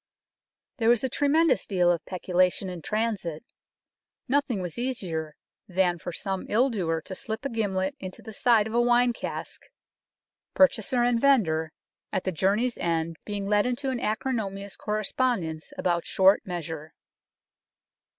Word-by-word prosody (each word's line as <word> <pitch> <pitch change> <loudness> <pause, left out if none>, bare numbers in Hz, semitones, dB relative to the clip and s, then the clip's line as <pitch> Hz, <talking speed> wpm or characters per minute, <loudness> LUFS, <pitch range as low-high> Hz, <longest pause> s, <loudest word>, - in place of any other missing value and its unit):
There 230 -3 +2
was 240 0 +4
a 260 - 0
tremendous 295 +5 +2
deal 180 -3 +3
of 170 -2 -1
peculation 185 +1 +1
in 175 -2 -7
transit. 210 -5 -2 0.8
Nothing 265 -5 +1
was 180 +2 -5
easier 170 - -3 0.3
than 180 -2 +1
for 175 - -5
some 190 +2 -4
ill 250 +5 +3
doer 165 -7 -1
to - - -6
slip 220 +6 -5
a - - 0
gimlet 195 -5 -1
into 185 -1 -8
the 220 - -9
side 225 -1 +4
of 220 - -5
a 240 - +4
wine 240 0 +4
cask, - - -6 0.9
purchaser 255 -2 +3
and 240 -1 +2
vendor 160 - +3 0.4
at 190 - -1
the 185 - -1
go - - -11
UNKNOWN 190 - +3
LONDON 200 +2 +3
journey's 245 0 -1
end 165 -1 -1
being 205 -1 -3
led 205 +2 +2
into 265 +2 -1
an 250 - -2
acrimonious 210 -4 -2
correspondence 210 -6 -1
about 175 -1 0
short 190 +1 +5
measure. 160 -3 -5
205 Hz, 155 wpm, -27 LUFS, 180-240 Hz, 0.9 s, short